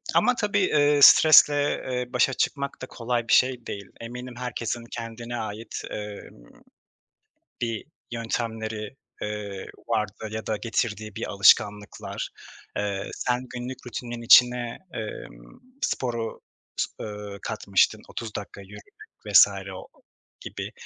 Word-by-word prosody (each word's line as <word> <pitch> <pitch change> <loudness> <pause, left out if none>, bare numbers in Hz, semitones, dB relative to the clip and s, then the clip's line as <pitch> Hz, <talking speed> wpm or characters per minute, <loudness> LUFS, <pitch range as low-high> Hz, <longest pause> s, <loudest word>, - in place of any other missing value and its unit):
ama 250 +3 +4
tabii 210 -3 0
eee, 150 -5 +3
stresle, 150 -2 +8 0.3
eee, 125 0 -3
başa 125 +1 +3
çıkmak 140 -2 -2
da - - -4
kolay 120 -1 -2
bir - - +2
şey 125 -2 +3
değil. 100 -1 -6
Eminim 125 +2 -7
herkesin 120 -1 -3
kendine 115 +1 -6
ait, 110 0 -5
emm, 105 - -9 1.0
bir 115 -2 -2 0.3
yöntemleri, 115 -1 -3 0.3
eee, 105 -2 -5 0.2
vardı 110 -1 -2
ya 110 0 -5
da 110 - 0
getirdiği 110 -1 -2
bir - - -4
alışkanlıklar. 105 +1 +2 0.5
Eee, 100 -1 -2
sen 125 0 -1
günlük 125 +1 -6
rutinin 120 -1 -5
içine, 120 0 +6 0.2
emm, - - -8 0.2
sporu, 115 -3 -2 0.4
s - - +2
eee, 105 -1 -7
katmıştın. 100 -3 +1
30 115 -2 -6
dakika 100 0 -7
yürümek 105 +1 -12 0.4
vs. 100 -2 +8 0.3
o - - -9 0.5
gibi. - - -6
115 Hz, 120 wpm, -26 LUFS, 105-125 Hz, 1.0 s, stresle